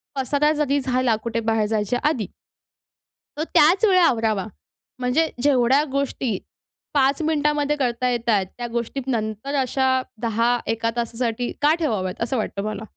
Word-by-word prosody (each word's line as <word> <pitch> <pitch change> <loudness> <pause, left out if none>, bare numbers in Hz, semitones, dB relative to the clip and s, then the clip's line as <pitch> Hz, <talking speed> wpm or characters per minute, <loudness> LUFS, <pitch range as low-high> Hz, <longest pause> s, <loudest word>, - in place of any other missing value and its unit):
पसारा 285 +3 +1
जरी 290 -2 +1
झाला 255 -3 +1
कुठे 230 0 -2
बाहेर 225 -1 +1
जायच्या 215 +2 -1
आधी 230 - -3 1.1
तो 310 - -1
त्याच 345 +8 +5
वेळी 370 -3 +5
आवरावा. 225 - +2 0.5
म्हणजे 255 +6 +2 0.2
जेवढ्या 270 0 +4
गोष्टी 270 -6 -1 0.6
5 275 +1 +2
मिनिटांमध्ये 295 -1 +1
करता 250 -2 0
येत 240 -1 -2
आहेत. 200 -4 +3
त्या 240 -1 -4
गोष्टी 235 +3 -3
नंतर 220 +2 -2
अशा 260 0 +1 0.2
10-1का 230 0 0
तासासाठी 235 0 -2
का 300 +2 +5
ठेवाव्यात 210 - -2
असं 250 +2 -1
वाटतं 200 -2 -3
मला. 215 +1 -4
250 Hz, 140 wpm, -22 LUFS, 225-280 Hz, 1.1 s, त्याच